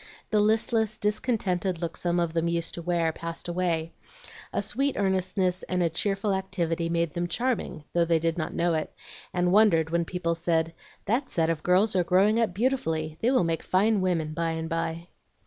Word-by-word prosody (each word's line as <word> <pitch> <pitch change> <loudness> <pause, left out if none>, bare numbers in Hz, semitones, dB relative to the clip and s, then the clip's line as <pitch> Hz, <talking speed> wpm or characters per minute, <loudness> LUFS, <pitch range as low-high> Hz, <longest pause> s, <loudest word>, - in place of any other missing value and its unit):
The 215 - +3
listless, 220 +1 +2
discontented 205 -5 0
look 170 -1 -3
some 175 0 0
of 170 -2 0
them 165 0 0
used 170 -1 -1
to 170 - -5
wear 170 -1 +1
passed 165 +2 -6
away; 170 -2 -1 0.6
a - - -1
sweet 275 +1 -1
earnestness 185 -1 0
and 180 -1 +1
a 165 - +1
cheerful 195 +4 0
activity 175 -3 -1
made 170 -1 0
them 175 0 -1
charming, 235 - -2
though 170 -1 +3
they 165 0 +3
did 165 0 0
not 160 -3 -3
know 170 0 +1
it, 155 -1 -2 0.4
and 180 0 +1
wondered 180 -6 +4
when 170 0 +1
people 175 -1 -1
said, 165 -1 0 0.3
"That 245 +6 0
set 165 -1 +1
of 160 -2 -3
girls 190 +5 +3
are 180 - +3
growing 195 +6 +3
up 230 -4 +2
beautifully; 165 -9 -1
they 235 - +3
will 260 -7 +3
make 165 -1 -1
fine 205 +2 +2
women 165 -4 0
by 165 +1 -1
and 160 0 -3
by." 165 +1 -3
175 Hz, 190 wpm, -27 LUFS, 165-195 Hz, 0.6 s, wondered